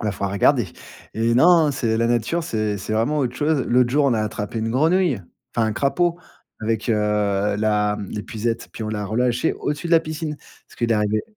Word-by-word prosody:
Bah, 105 -2 -1
faudra 100 0 -3
regarder. 120 +3 +3 0.5
Et 115 +1 +1
non, 160 +1 +5
c'est 115 -4 0
la 115 +1 +1
nature, 120 +8 0
c'est 110 -7 -2
c'est 110 - -5
vraiment 115 +8 +1
autre 125 -3 -1
chose. 150 -2 +1
L'autre 125 0 +3
jour, 145 +2 +3
on 130 - +3
a 110 - 0
attrapé 110 +1 -3
une 115 - -2
grenouille, 160 - +2 0.4
enfin 115 -1 +2
un 110 - -1
crapaud, 170 +7 0 0.4
avec, 110 0 -2
heu, 115 - +4
la 105 0 +1
hem, 100 - -6
l'épuisette. 115 +2 -4
Puis, 110 - -6
on - - -4
l'a 105 -1 -3
relâché 120 +7 0
au-dessus 150 +3 -3
de 170 - -1
la 165 - +8
piscine, 155 -1 -5
parce - - -21
qu'il 115 -1 +1
arrivait 105 0 +1
115 Hz, 205 wpm, -22 LUFS, 105-145 Hz, 0.5 s, la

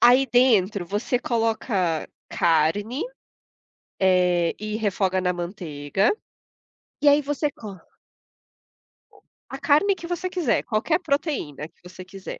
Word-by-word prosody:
Aí 250 +3 +6
dentro 215 -7 +3
você 210 +7 -1
coloca 220 -8 -1 0.2
carne, 200 - +1 1.0
eh, 180 -2 +3
e 215 0 -4
refoga 195 -3 0
na 180 -1 0
manteiga, 175 - -1 0.9
e 295 - +2
aí 290 +1 +5
você 290 +1 -1
co 215 -10 -10 1.3
O - - -22 0.3
A - - -6
carne 355 +7 +3
que 340 - -9
você 355 +1 -3
quiser, 340 -11 0
qualquer 240 +10 0
proteína 280 - -2
que - - -34
você 185 0 -11
quiser. 190 +1 -9
215 Hz, 120 wpm, -24 LUFS, 180-280 Hz, 1.3 s, Aí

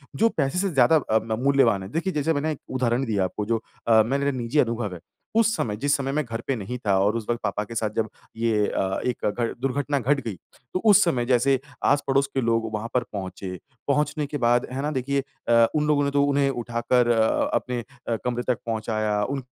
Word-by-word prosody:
जो 230 +2 +3
पैसे 140 +4 +1
से 195 - +1
ज़्यादा 140 -1 +4
अ, 110 -6 +1
म 110 +1 -3
मूल्यवान 130 -8 +3
है। 95 - -8
देखिए 170 +7 -2
जैसे 150 +2 +1
मैंने 155 +1 -1
एक 150 - -5
उदाहरण 125 0 0
दिया 105 -5 0
आपको 105 +3 -3
जो 115 0 0 0.3
अ, 110 -1 +6
मेरा 140 +3 0
निजी 130 +3 -1
अनुभव 115 -6 0
है। 90 - -8 0.4
उस 225 0 +3
समय, 105 - -2
जिस 145 +6 +1
समय 135 -1 -2
मैं 150 +2 0
घर 115 0 -5
पे 135 - +1
नहीं 115 +3 -5
था 100 -2 +3
और 105 +3 +2
उस 115 - -3
वक़्त 120 - 0
पापा 105 0 -1
के 115 +3 -9
साथ 110 -1 0
जब 110 -2 0 0.3
ये 110 -3 +1
अ, 95 0 -1
एक 125 -2 -2
घट 115 +2 -2
दुर्घटना 140 +2 0
घट 140 +3 +1
गई। 110 -4 -3 0.4
तो 185 - +1
उस 205 +1 +7
समय 130 -9 +1
जैसे 130 +2 +3 0.3
आस-पड़ोस 140 -1 +2
के 135 - +1
लोग 115 -1 0
वहाँ 110 +2 -3
पर 125 - +2
पहुँचे, 95 -1 -5 0.3
पहुँचने 150 +1 +1
के 145 +1 -4
बाद 120 +1 +3
है 130 +2 -3
ना 150 - -1
देखिए 140 0 -1 0.3
अ, 115 -1 +6
उन 150 0 +1
लोगों 145 -1 +3
ने 140 - 0
तो 140 0 +3
उन्हें 140 -1 +2
उठाकर 120 -1 0
अ, 110 -1 +2
अपने 125 -1 -1 0.3
अ, 115 - +1
कमरे 125 0 -1
तक - - -10
पहुँचाया। 110 -2 -1
उन 135 +2 -3
125 Hz, 225 wpm, -24 LUFS, 115-140 Hz, 0.4 s, उस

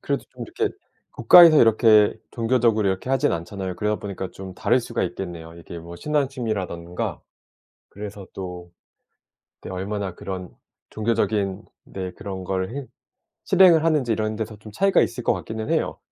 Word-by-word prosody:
그래도 - - -2
좀 - - -9
이렇게 430 -1 -2 0.4
국가에서 170 -4 +8
이렇게 110 -2 +5 0.2
종교적으로 115 -3 +2
이렇게 95 +6 -3
하진 135 +2 +2
않잖아요. 90 +2 -4
그러다 105 +2 -1
보니까 95 -2 -5
좀 95 -1 -9
다를 125 - +2
수가 115 0 -3
있겠네요. 85 -2 -6
이게 85 0 -9
뭐 85 +1 -10
신앙심이라든가. 110 - -3 0.7
그래서 100 -1 -8
또 90 -2 -7 0.9
그때 - - -8
얼마나 95 -1 -4
그런 90 -2 -6 0.4
종교적인 105 -3 -1 0.2
네 95 -1 -6
그런 95 -3 -7
걸 95 +1 -2
행 140 -2 -5 0.6
실행을 175 -4 +6
하는지 145 -8 +2
이런 110 0 -1
데서 110 0 -5
좀 105 0 -12
차이가 195 0 +3
있을 120 0 -2
것 - - +3
같기는 110 0 -5
해요. - - 0
105 Hz, 355 characters per minute, -23 LUFS, 95-115 Hz, 0.9 s, 국가에서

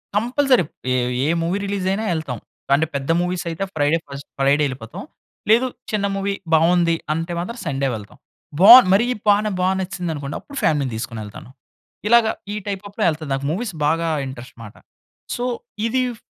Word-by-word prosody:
Compulsory. 250 +1 +3 0.3
ఏ - - +2 0.3
ఏ - - +1
movie 175 +4 0
రిలీజయినా 195 +1 -1
ఎళ్తాం. 140 -8 -4 0.4
అంటే, 155 +3 +1
పెద్ద 140 +2 -3
మూవీసయితే, 180 -1 -2
ఫ్రైడే 145 +2 +2
ఫస్ట్ 140 0 -9
ఫ్రైడే 140 +2 +3
ఎళ్ళిపోతాం. 125 -4 -7 0.5
లేదు, 235 +4 +5 0.2
చిన్న 210 -2 0
మూవీ 195 0 -1 0.2
బావుంది. 170 +1 +4 0.2
అంటే 165 +2 -3
మాత్రం, 210 +8 -5
సండే 135 -3 -1
వెళ్తాం. 105 -2 -10 0.4
బావుంది, 235 +1 +10
మరీ 205 +5 +4 0.2
బానే 210 +1 +4
బా 180 - +2
నచ్చిసిందనుకోండి, 175 -7 -4
అప్పుడు 285 - -11
ఫ్యామిలీ‌ని 140 -4 +1
తీసుకొనెళ్తాను. 110 0 -7 0.6
ఇలాగ 235 +1 +6 0.3
ఈ - - -3
టైప్ 200 -1 -3
అప్‌లో 210 +2 -4
ఎళ్తాను. 155 -2 -5
నాకు 135 +1 -2
మూవీస్ 195 +3 -3
బాగా 165 +2 +1 0.2
ఇంట్రెస్ట్ 125 -2 -10
మాట. 105 - -11 0.6
సో, 245 - -2 0.4
ఇది 255 +2 +1 0.2
ఫ్ - - -34
170 Hz, 155 wpm, -21 LUFS, 140-205 Hz, 0.6 s, బావుంది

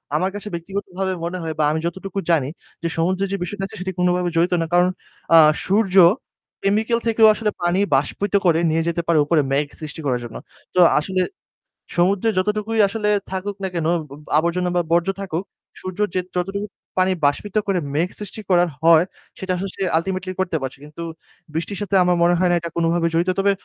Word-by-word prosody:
আমার 185 +5 +1
কাছে 205 +1 -6
ব্যক্তিগতভাবে 190 +2 -3
মনে 175 +2 -3
হয় 160 -1 -3
বা - - +3
আমি 155 - -1
যতটুকু 190 +3 -4
জানি 140 -5 +2 0.3
যে, - - +1
সমুদ্রে 185 +4 +1
যে 200 - 0
বিষয়টা 195 +2 -5
আছে - - -12
সেটি 190 - -3
কোনভাবে 180 0 +2
জড়িত 175 +2 +2
না। - - 0
কারণ 180 +1 +5 0.5
আ - - +10 0.3
সূর্য 195 -1 +1 0.7
কেমিক্যাল 220 +4 +2
থেকেও 225 -1 +5
আসলে 210 0 -1
পানি 175 +2 +2 0.2
বাষ্পিত 185 +8 -1
করে 165 -1 +4
নিয়ে 160 +1 +1
যেতে 170 0 0
পারে 165 -2 +4
উপরে 155 +1 +3
মেঘ 140 +2 +2 0.2
সৃষ্টি 155 +1 -7
করার 125 -3 +1
জন্য। 120 - -9 0.4
তো - - +3 0.2
আসলে 185 +4 -1 0.7
সমুদ্রে 190 +5 +2
যতটুকুই 210 +3 0
আসলে 210 +1 -1 0.2
থাকুক 195 +2 -3
না 190 - 0
কেন 165 -2 -1 0.2
উবু 145 -3 -11 0.2
আবর্জনা 170 +3 +1
বা 175 - +3
বর্জ্য 170 +2 +3
থাকুক, 180 -2 -3 0.4
সূর্যের 185 +2 -2
যে - - +3 0.2
যতটুকু 195 +3 -2 0.3
পানি 185 0 +3
বাষ্পিত 185 +8 0
করে 195 -2 +1
মেঘ 165 +5 +1
সৃষ্টি 210 +1 -7
করার 175 -1 +4
হয় 165 0 +6 0.4
সেটা 190 -1 -3
আসলে 195 +1 -6 0.2
আল্টিমেটলি 185 +2 -3
করতে 180 -3 0
পারছে। 135 0 -5
কিন্তু 150 +3 -8 0.5
বৃষ্টির 170 +5 -3
সাথে 200 -1 -1
আমার 180 0 +3
মনে 175 +1 +4
হয় 180 -1 +3
না - - +4
এটা 170 - -6
কোনভাবে 170 0 +2
জড়িত। 170 +2 +1
তবে 200 +1 +3
180 Hz, 190 wpm, -21 LUFS, 165-195 Hz, 0.7 s, আ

